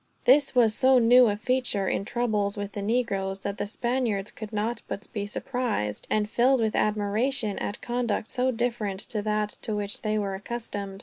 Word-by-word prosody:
This 275 +1 +5
was 230 -3 +5
so 260 +2 +5
new 245 +1 +6
a 205 -1 0
feature, 240 -4 0
in 195 - -1
troubles 210 -4 -1
with 205 0 -4
the 205 - -5
negroes, 200 -4 -1
that 200 +1 -4
the 205 - -2
Spaniards 230 -3 -1
could 215 -1 -8
not 220 +3 -2
but 200 - -5
be 205 -3 -3
surprised, 215 - -2
and 210 -1 +1
filled 250 +4 +3
with 220 -2 0
admiration 215 +2 0
at 205 - -5
conduct 240 -3 -2
so 255 0 +1
different 230 -5 -1
to 215 - -3
that 210 0 0
to 220 -3 -3
which 205 -1 -4
they 215 -1 0
were 200 -2 -1
accustomed. 200 -2 -5
215 Hz, 185 wpm, -26 LUFS, 205-245 Hz, -, new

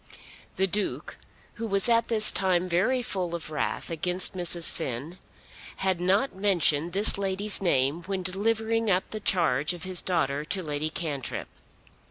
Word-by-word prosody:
The 190 - +1
Duke, 200 +2 -3 0.4
who 230 - -3
was 200 0 +3
at 230 -1 +2
this 215 -2 +9
time 185 -2 0
very 205 +9 0
full 180 -6 -3
of 160 -2 -8
wrath 150 +2 -4
against 180 +4 +1
Mrs. 175 -2 +5
Finn, 150 +4 -6 0.6
had 190 -2 -2
not 195 +8 0
mentioned 175 -5 0
this 200 +1 +3
lady's 195 +1 -2
name 145 -3 0
when 190 -1 -4
delivering 220 +4 -2
up 185 -1 0
the 215 - -5
charge 160 -7 0
of 175 -2 -10
his 185 -2 0
daughter 145 -5 -2
to 185 +4 -3
Lady 150 0 -3
Cantrip. 150 -5 -5
185 Hz, 155 wpm, -25 LUFS, 165-200 Hz, 0.6 s, this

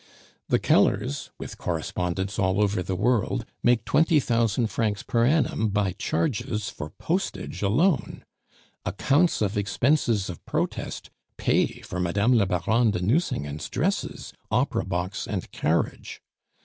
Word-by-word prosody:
The - - +3
Kellers, 70 - +2
with - - -8
correspondents 90 +3 -2
all 95 +1 +2
over 100 -2 +2
the 95 +1 -2
world, 115 +3 +1 0.2
make 120 -2 +3
twenty 160 0 +4
thousand 115 -2 +1
francs 105 -3 -1
per 115 0 +2
annum 135 -7 +2
by 100 -2 +1
charges 110 - -1
for 75 -10 -7
postage 180 - -3
alone; 140 - +1 0.6
accounts 145 -2 +2
of 100 0 -1
expenses 110 +1 +1
of 90 - -8
protest - - -3 0.3
pay - - +1
for 90 - -5
Mme. 100 +7 +2
la 110 -5 +4
Baronne 105 +6 +2
de 105 - -1
Nucingen's 90 - -1
dresses, 185 +10 -2 0.2
opera - - +1
box, 90 +1 -3
and - - -4
carriage. 80 +2 -1
105 Hz, 130 wpm, -26 LUFS, 95-125 Hz, 0.6 s, twenty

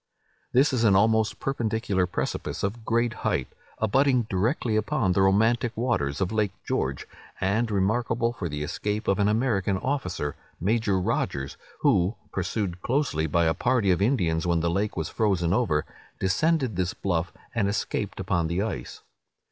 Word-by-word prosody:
This 135 +3 +4
is 120 -3 +1
an 105 -4 +5
almost 110 +2 +3
perpendicular 110 -7 0
precipice 90 - -3
of 110 +4 -2
great 115 +1 +1
height, 65 - 0 0.3
abutting 130 +3 +3
directly 110 - 0
upon 105 -2 +1
the 95 - +2
romantic 110 +5 +2
waters 90 - 0
of 95 -1 0
Lake 105 -3 0
George, 65 0 -1 0.3
and 110 +5 +1
remarkable 115 +4 +1
for 90 -7 -4
the 75 0 -3
escape 105 +8 -3
of 100 - +2
an 100 - +3
American 105 -4 +1
officer, 90 - -2 0.2
Major 100 0 +1
Rogers, 70 -6 -1 0.3
who, 90 +6 +3 0.2
pursued 95 -5 -2
closely 120 - 0
by 85 +3 +2
a 80 - +3
party 100 - +2
of 90 - +1
Indians 90 -8 +1
when 85 -1 +2
the 85 +1 +1
lake 100 +3 -1
was 80 -3 -1
frozen 95 -6 +1
over, 95 -10 +1 0.3
descended 130 - +1
this 90 -1 -1
bluff, 90 -2 -1 0.2
and 115 -4 +1
escaped 100 +1 -2
upon 85 -3 0
the 85 +4 0
ice. 65 - -5
100 Hz, 155 wpm, -26 LUFS, 90-115 Hz, 0.3 s, an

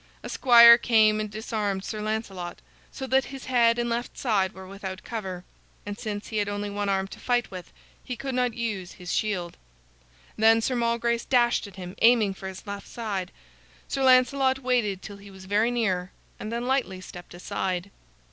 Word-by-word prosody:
A - - -6
squire 235 -2 +8
came 215 -3 +4
and 215 0 -3
disarmed 210 -2 -3
Sir 215 -1 -4
Lancelot, 210 -5 -4 0.3
so 265 - -6
that 265 0 +2
his 270 -1 -9
head 235 -2 +3
and 240 0 0
left 235 +1 -3
side 200 -7 +1
were 190 +1 -11
without 190 -1 -7
cover; 190 -6 -5 0.4
and 205 0 -5
since 210 -2 -5
he 220 - -3
had 205 -1 0
only 205 0 -3
one 205 0 -2
arm 195 0 0
to - - -11
fight 245 -3 0
with, 185 -2 -9 0.3
he 250 - -5
could 270 +2 -5
not 250 -2 0
use 210 -6 -4
his 180 -1 -6
shield. 180 -5 -2 0.8
Then 225 +1 +5
Sir 250 +3 -1
Malgrace 235 0 0
dashed 240 -4 +2
at 200 - -14
him, 180 -1 -8
aiming 225 -4 +5
for 190 0 -8
his 190 +2 -9
left 200 -1 -7
side. 205 -6 -4 0.6
Sir 275 - -3
Lancelot 260 +1 +4
waited 245 -7 0
till 205 -1 -8
he 200 0 -13
was 190 -1 -13
very 210 +4 +2
near, 190 -7 -1 0.3
and 215 - -6
then 235 +1 -3
lightly 255 -8 0
stepped 175 -1 -11
aside. 185 0 -3
215 Hz, 185 wpm, -26 LUFS, 195-240 Hz, 0.8 s, squire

